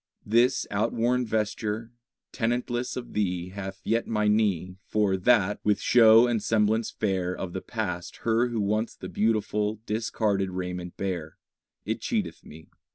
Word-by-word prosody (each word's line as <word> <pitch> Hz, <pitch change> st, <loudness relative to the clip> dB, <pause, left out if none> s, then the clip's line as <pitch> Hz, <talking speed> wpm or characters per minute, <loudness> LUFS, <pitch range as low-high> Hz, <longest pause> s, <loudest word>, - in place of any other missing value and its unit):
This 120 Hz, +4 st, +3 dB
outworn 115 Hz, +4 st, +1 dB
vesture, 110 Hz, +1 st, -2 dB, 0.4 s
tenantless 120 Hz, +1 st, -1 dB
of 125 Hz, -, -7 dB
thee, 90 Hz, -4 st, -1 dB
Hath 95 Hz, 0 st, -7 dB
yet 115 Hz, +1 st, 0 dB
my 105 Hz, -1 st, +1 dB
knee, 95 Hz, -4 st, +1 dB
For 105 Hz, -3 st, +2 dB
that, 105 Hz, 0 st, +3 dB
with 105 Hz, -1 st, +2 dB
show 115 Hz, -1 st, +7 dB
and 120 Hz, -3 st, 0 dB
semblance 110 Hz, +1 st, +1 dB
fair 95 Hz, -3 st, -1 dB
Of 90 Hz, -2 st, -5 dB
the 95 Hz, -, -4 dB
past 95 Hz, -7 st, -4 dB
Her 115 Hz, +2 st, +3 dB
Who 115 Hz, -3 st, -2 dB
once 110 Hz, +3 st, -1 dB
the -, -, -8 dB
beautiful, 105 Hz, -1 st, 0 dB
discarded 105 Hz, -3 st, 0 dB
raiment 90 Hz, -1 st, -5 dB
bare, 90 Hz, -5 st, -4 dB, 0.5 s
It -, -, -2 dB
cheateth -, -, -2 dB
me. 80 Hz, +2 st, -13 dB
105 Hz, 145 wpm, -27 LUFS, 95-115 Hz, 0.5 s, show